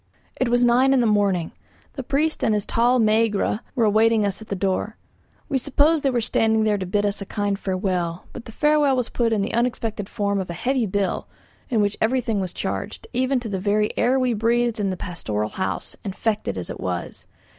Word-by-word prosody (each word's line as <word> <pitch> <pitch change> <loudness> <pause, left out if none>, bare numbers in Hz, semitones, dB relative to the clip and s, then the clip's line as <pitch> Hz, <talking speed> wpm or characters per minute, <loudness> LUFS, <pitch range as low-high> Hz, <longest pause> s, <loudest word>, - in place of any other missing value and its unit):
It 255 - 0
was 245 0 +3
nine 255 +3 +4
in 265 - +4
the 240 - +3
morning. 200 -6 +1 0.4
The 275 - -5
priest 295 +5 0
and 220 - +3
his 205 - -1
tall 245 +2 +2
Megæra 215 -1 +2 0.2
were 235 -4 +3
awaiting 220 +1 +3
us 200 +1 -3
at 220 - -10
the 200 - -3
door. 195 +3 -1 0.5
We 270 - 0
supposed 295 +5 +2
they 275 - +2
were 245 -2 0
standing 220 0 +2
there 210 -2 +1
to 185 - -4
bid 205 +3 +1
us 205 0 -1
a - - -4
kind 205 -2 -1
farewell. 185 -3 -2
But 235 - -9
the - - -9
farewell 295 +1 +3
was 250 -2 -1
put 235 -2 0
in 210 -3 +1
the 200 - -4
unexpected 225 -3 -1
form 200 -2 -1
of 185 - -4
a - - -3
heavy 250 +4 0
bill, 200 0 -1 0.4
in 225 -4 +2
which 205 0 0
everything 230 -2 +1
was 185 -2 -3
charged, - - -4
even 260 +1 +1
to 235 - -5
the 195 -3 -3
very 210 +2 +1
air 250 +3 +2
we 255 -2 +1
breathed 230 +1 +1
in 200 -2 0
the 185 - -3
pastoral 110 - -3
house, 190 +9 -4
infected 210 - -2
as 90 - -5
it - - -8
was. 90 -1 -5
220 Hz, 215 wpm, -23 LUFS, 200-245 Hz, 0.5 s, nine